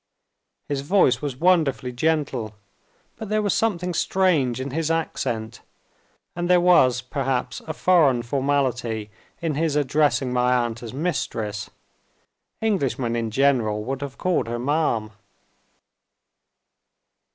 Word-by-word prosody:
His 140 -2 -2
voice 140 -6 +3
was 145 -4 -3
wonderfully 155 -5 +2
gentle. 130 -5 -1 0.6
But 220 -3 -7
there 215 0 +1
was 205 - +1
something 180 -5 0
strange 160 -10 +1
in 130 +1 -4
his 160 +2 -1
accent 120 -8 -2 0.7
and 175 +1 -2
there 180 -1 +6
was 150 -9 +4
perhaps 130 -1 -2
a 155 - -3
foreign 150 -9 +3
formality 120 -5 -1 0.3
in 160 -2 0
his 155 0 0
addressing 145 -2 +1
my 125 0 +2
aunt 120 -2 -1
as 115 -2 -7
"Mistress." 115 - -3 0.9
Englishmen 135 - 0
in 115 -1 -1
general 115 -4 +1
would 135 +4 -4
have 140 -2 -6
called 180 -9 0
her 120 +1 -3
"ma'am." 125 -5 0
135 Hz, 120 wpm, -23 LUFS, 120-165 Hz, 0.9 s, there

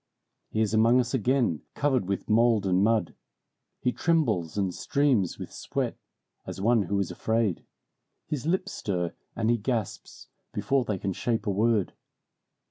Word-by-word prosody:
He 110 - -1
is 110 -1 +1
among 115 +3 +5
us 120 0 -1
again, 125 - +1
covered 130 -9 +1
with 100 0 -2
mold 115 -2 +3
and 95 0 +3
mud. 110 -5 +2 0.7
He 125 - +2
trembles 120 - 0
and 95 -3 0
streams 130 - +1
with - - -7
sweat, - - -3 0.5
as - - -7
one 115 +3 +3
who 100 +1 -1
is 95 - -1
afraid. 110 -5 0 0.6
His 150 -1 -4
lips 185 +3 0
stir, 90 -6 -2 0.2
and 115 0 +1
he 120 - +3
gasps, 115 -2 -4 0.2
before 135 -2 +1
they 105 -5 -1
can 95 +1 -2
shape 115 +4 -1
a 105 - +1
word. 105 0 +1
110 Hz, 155 wpm, -27 LUFS, 100-125 Hz, 0.7 s, among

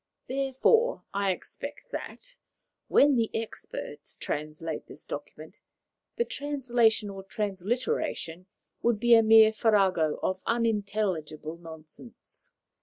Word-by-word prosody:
Therefore, 275 - +2
I 200 0 +1
expect 190 - -6
that, - - -7 0.5
when 285 0 +5
the 230 -3 +2
experts 150 -9 -8
translate 155 +2 -4
this - - -13
document, - - -8 0.6
the 470 - +1
translation 240 - +1
or 195 0 -7
transliteration 195 - -2 0.3
will 235 -1 +3
be 240 +3 +4
a 225 - +8
mere 220 0 +7
farrago 195 -8 +2
of 185 0 -1
unintelligible 200 -9 -1
nonsense. 165 - -12
215 Hz, 105 wpm, -28 LUFS, 180-240 Hz, 0.6 s, a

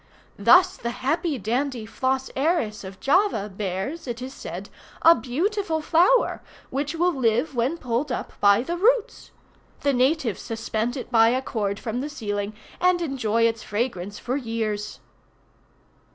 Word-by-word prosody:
Thus 365 +1 +6
the 235 - -3
happy 280 +5 -1
dandy 240 +2 -2
Flos 260 +3 -1
Aeris 275 -8 0
of 190 0 -9
Java 300 - +2
bears, 195 - -4
it 240 -1 -4
is 260 +1 -6
said, - - -7 0.3
a 330 - +9
beautiful 335 - -1
flower, 350 +10 +3 0.3
which 285 +4 -2
will 350 +2 +2
live 245 +2 +1
when 255 +7 0
pulled 255 0 -2
up - - -4
by 200 +3 +5
the 345 +5 -3
roots. 460 +4 +1 0.5
The 280 - +2
natives 255 - +1
suspend 225 +2 -3
it 255 - -7
by 225 -1 +6
a 255 +2 +1
cord 200 -5 -2
from 240 +2 -3
the 290 - -4
ceiling 205 -5 -4 0.2
and 360 0 +3
enjoy 250 -8 0
its 225 -1 +1
fragrance 205 -3 -3
for 250 - -3
years. 220 -5 -3
255 Hz, 150 wpm, -24 LUFS, 225-315 Hz, 0.5 s, a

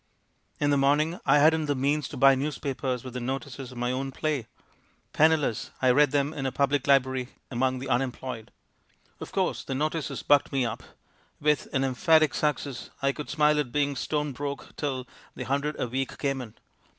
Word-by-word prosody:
In 145 -1 +2
the 140 - +3
morning 150 +6 +2
I 135 - +6
hadn't 155 +1 +4
the 145 - +1
means 140 +2 0
to - - -8
buy 135 +1 +7
newspapers 135 -2 -2
with 130 -2 -8
the 125 - -3
notices 130 +1 -5
of 125 - -11
my 125 +1 -1
own 135 +1 -2
play. 145 -4 -2 0.7
Penniless, 155 -7 +2
I 130 -1 +4
read 145 +2 +5
them 145 +2 0
in 135 -3 -3
a - - -1
public 140 0 +1
library 130 -2 +3 0.2
among 130 +1 +1
the 130 +2 -6
Unemployed! 125 -2 -2 0.7
"Of - - -8
course, - - -1
the 135 - -4
notices 155 +2 -2
bucked 145 -1 +4
me 135 -3 +1
up. 115 - -4 0.6
With 150 0 +1
an 135 - +1
'emphatic 155 +4 +3
success,' 140 -4 -2
I 140 - +3
could 150 +1 -7
smile 150 0 +3
at 135 -5 -2
being 145 0 0
stone 150 +2 -1
broke 140 +2 -6
till 130 -3 -3 0.3
the - - -5
hundred 140 +2 -1
a - - 0
week 130 +2 -3
came 135 -2 -1
in. 115 -3 -10
140 Hz, 185 wpm, -27 LUFS, 130-150 Hz, 0.7 s, buy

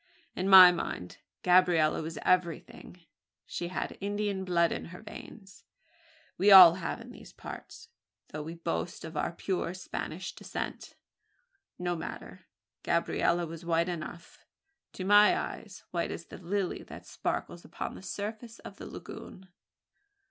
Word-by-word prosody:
In 185 +2 -1
my 185 -2 +11
mind 90 - -5 0.2
Gabriella 175 -4 +4
was 160 0 -6
everything. 180 0 -1 0.4
She 175 - -4
had 180 - -5
Indian 205 -1 -2
blood 170 -2 +2
in - - -4
her 180 +2 -10
veins: 195 -6 -12 0.8
we 200 +3 +5
all 185 -4 +11
have 185 0 -4
in - - -11
these - - -13
parts, - - -10 0.4
though 155 - -6
we 160 +3 -7
boast 170 +3 -4
of 160 0 -9
our 150 - -1
pure 180 0 -3
Spanish 185 - -6
descent. - - -6 0.8
No 175 -1 -2
matter; 165 - -8 0.3
Gabriella 175 0 +1
was 165 0 -9
white 170 +1 +1
enough 170 0 -8 0.5
to 185 - -6
my 205 +1 +6
eyes 200 -4 -6
white 170 -1 -1
as 170 - -6
the - - -11
lily 185 +1 -2
that - - -11
sparkles - - -4
upon - - -6
the 90 - -10
surface 215 - -6
of - - -11
the - - -9
lagoon. 190 0 -10
180 Hz, 140 wpm, -30 LUFS, 170-190 Hz, 0.8 s, my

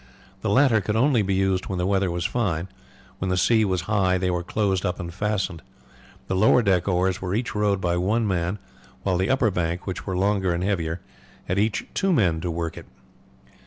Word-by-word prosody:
The 110 - -1
latter 115 0 +4
could 105 +3 -2
only 125 0 +3
be 100 -1 0
used 95 -1 0
when 95 - -3
the 90 - 0
weather 95 -1 +1
was 85 0 -2
fine; 95 -8 -1 0.5
when 95 - -2
the 90 - +1
sea 110 +4 +4
was 95 -3 0
high 95 -3 +1
they 90 0 0
were 90 -1 -1
closed 95 +1 0
up 90 - -2
and 85 -1 -6
fastened. 95 -3 -2 0.6
The 95 - -2
lower 110 +5 +4
deck 95 -3 +2
oars 90 0 +1
were 95 +1 -2
each 120 +2 -2
rowed 105 -2 +1
by 85 -1 0
one 105 +5 +1
man, 90 0 -1 0.5
while 95 -2 +1
the 95 - 0
upper 130 -5 +2
bank, 85 0 -2
which 95 +1 -5
were 95 -2 -1
longer 95 -2 +1
and 85 - -2
heavier, 85 -3 -1 0.4
had 95 +2 -1
each 105 0 0
two 195 -1 +1
men 90 - +2
to 90 - -3
work 85 -1 -3
it. - - -14
95 Hz, 210 wpm, -24 LUFS, 90-105 Hz, 0.6 s, latter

